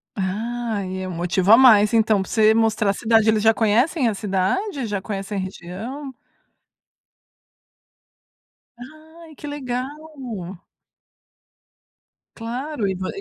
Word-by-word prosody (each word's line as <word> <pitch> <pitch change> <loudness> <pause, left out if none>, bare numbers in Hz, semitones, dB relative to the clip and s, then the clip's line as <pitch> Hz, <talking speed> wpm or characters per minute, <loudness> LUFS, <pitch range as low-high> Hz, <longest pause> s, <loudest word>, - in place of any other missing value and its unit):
Ah, 220 +2 -3
e 185 0 -5
é 185 - -4
motivo 180 +2 0
a 225 - +9
mais, 220 -5 +6
então, 220 -3 +3
pra 190 - -7
você 220 -1 +4
mostrar 220 -2 +1
a - - -3
cidade. 220 +1 +2
Eles 215 -1 +2
já 225 0 +5
conhecem 240 +7 +1
a 225 - 0
cidade? 215 - -2
Já 205 -3 -3
conhecem 195 0 -5
a - - -1
região? 215 +10 -7 2.6
Ai, 310 +5 -14
que 295 - -9
legal. 255 -4 -3 2.5
Claro, 240 +1 -4
e 190 - -2
vo 185 +1 -5
220 Hz, 125 wpm, -22 LUFS, 195-250 Hz, 2.6 s, a